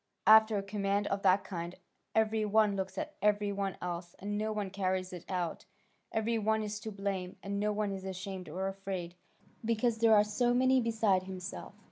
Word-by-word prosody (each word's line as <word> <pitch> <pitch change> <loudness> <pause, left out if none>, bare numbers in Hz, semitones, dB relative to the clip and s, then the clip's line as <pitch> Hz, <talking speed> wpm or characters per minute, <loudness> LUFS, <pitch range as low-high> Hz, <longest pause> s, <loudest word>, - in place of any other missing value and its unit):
After 220 0 +7
a 200 - -1
command 200 0 0
of 200 0 -1
that 190 0 +4
kind, 175 -1 -5 0.4
every 220 0 +2
one 210 -1 +3
looks 190 -1 -4
at 310 0 -3
every 205 -1 +2
one 195 -1 -2
else, 175 -1 -5
and 205 +1 -4
no 215 +1 -1
one 205 -3 -3
carries 185 -1 -1
it 175 - -7
out, 180 -3 -2 0.5
every 225 +1 0
one 220 +1 +1
is 210 0 -4
to 220 +1 -6
blame, 195 -2 -3
and 200 0 -2
no 210 +1 +1
one 210 -1 -1
is 190 -1 -5
ashamed 190 -1 -6
or 190 +5 -2
afraid, 195 -3 -4 0.5
because 230 0 +1
there 225 -1 +6
are 205 - +6
so 240 +4 +1
many 260 +1 +4
beside 220 -5 +2
himself. 185 -2 -7
200 Hz, 190 wpm, -32 LUFS, 190-220 Hz, 0.5 s, After